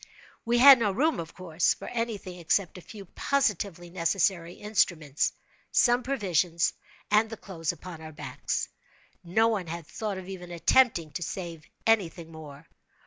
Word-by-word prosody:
We 235 +1 +2
had 270 +1 +10
no 210 -3 +1
room, 300 +11 +1
of 165 -1 -7
course, 170 -2 +1
for - - -9
any 230 -2 -2
thing 180 -2 -10
except 180 +2 0
a - - -13
few 200 +2 -11
positively 195 - -1
necessary 175 0 0
instruments, 170 -9 0 0.4
some 245 0 +4
provisions, 180 - 0 0.4
and 215 +1 +4
the 225 - -7
clothes 165 -5 -3
upon 175 -3 -10
our 155 0 -8
backs. 150 - -3 0.6
No 220 +6 +3
one 200 -6 -2
had 170 0 -6
thought 210 +3 -4
of 185 -1 -8
even 180 -2 -8
attempting 175 -1 +3
to 145 - -5
save 170 -3 -6 0.2
any 225 -6 +4
thing 165 0 -12
more. 150 -1 -11
185 Hz, 160 wpm, -28 LUFS, 165-220 Hz, 0.6 s, had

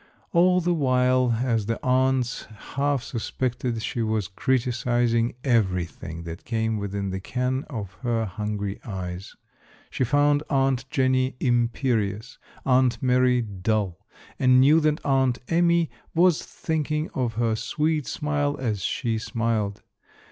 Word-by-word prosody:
All 180 +1 +5
the 175 +1 +1
while, 130 -5 +2
as 115 -5 0
the 115 - -1
aunts 130 0 +1 0.3
half 140 -2 0
suspected, 120 -1 -3
she 120 - -2
was 110 -4 0
criticising 120 0 +1
everything 90 - -1
that 85 0 -8
came 110 -1 -1
within 100 -1 -3
the 95 - -3
ken 125 +6 -2
of 105 - -6
her 115 -3 0
hungry 105 0 -4
eyes. 95 -3 -6 0.6
She - - 0
found 145 +3 +3
Aunt 135 -2 +1
Jenny 130 -1 +1
imperious, 120 -2 0 0.3
Aunt 125 -3 +3
Mary 125 -1 +3
dull, 100 -2 -2 0.4
and 130 -1 +5
knew 145 +5 +6
that 155 -1 0
Aunt 130 -3 +2
Amy 170 -1 +3 0.2
was 175 -1 +4
thinking 155 -1 -2
of 125 -3 -1
her 115 -1 +1
sweet 150 +4 -1
smile 145 -1 -1
as 110 -6 -2
she 115 +2 -1
smiled. 110 -3 -2
125 Hz, 125 wpm, -25 LUFS, 110-135 Hz, 0.6 s, knew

